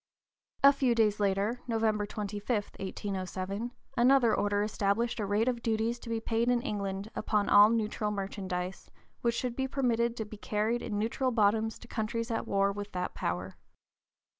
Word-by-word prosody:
A 280 +1 +9
few 260 -4 +2
days 215 -2 +2
later, 200 +4 0
November 220 -3 +1
25, 205 0 -5 0.3
1807, 195 +3 -4 0.2
another 240 -2 +5
Order 205 0 +1
established 215 +3 0
a 205 - -1
rate 210 +4 +1
of 245 -2 0
duties 225 +1 0
to 235 - -9
be 230 -1 0
paid 230 +1 0
in 245 -1 +3
England 200 -3 -3
upon 210 -2 0
all 205 +1 +8
neutral 215 -2 0
merchandise 190 -2 -4 0.3
which 235 -1 +1
should 245 -1 -2
be 265 +1 -1
permitted 235 -3 0
to 220 - -3
be 210 0 -10
carried 215 +3 -1
in 205 - -3
neutral 230 +5 0
bottoms 220 -1 +2
to 240 - -14
countries 230 +1 -2
at 225 - -2
war 200 0 +2
with 205 0 -6
that 180 -1 -3
power. 90 +2 -3
215 Hz, 165 wpm, -30 LUFS, 200-235 Hz, 0.3 s, A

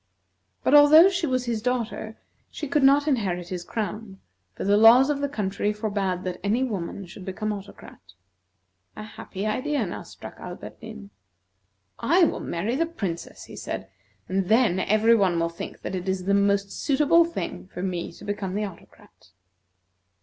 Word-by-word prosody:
But - - +2
although 300 +5 +8
she 360 -3 -1
was 255 -2 0
his 230 -3 -2
daughter, 230 -2 -3 0.3
she 300 - -6
could 295 +2 +1
not 280 +2 +5
inherit 185 - -1
his 180 -2 -4
crown, 210 0 -5 0.4
for - - -5
the 200 +1 +3
laws 235 +6 +7
of 285 - -2
the 285 0 -1
country 205 -4 -1
forbade 200 -4 -2
that 180 -1 -4
any 220 +6 +1
woman 200 -5 -4
should 185 +2 -11
become 210 +3 -3
Autocrat. 200 0 -11 0.9
A 215 - -7
happy 210 -2 -7
idea 255 +3 -1
now 175 - -6
struck - - -11
Alberdin. 100 +1 -9 0.9
"I 340 +10 +3
will 325 - +1
marry 205 +9 -2
the 330 +4 +1
Princess," 195 - -5
he - - -11
said, 95 - -6 0.4
"and 190 -1 -1
then 220 -5 +3
every 215 +4 +3
one 185 -6 +2
will 165 0 0
think 170 - -9
that - - -4
it 185 0 -3
is 190 -1 -1
the 200 - +2
most 200 0 +2
suitable 300 +4 +3
thing 335 - -5
for 180 -1 -7
me 180 -3 -3
to 200 - -13
become 200 -2 -3
Autocrat." 200 -5 -9
210 Hz, 165 wpm, -25 LUFS, 190-255 Hz, 0.9 s, although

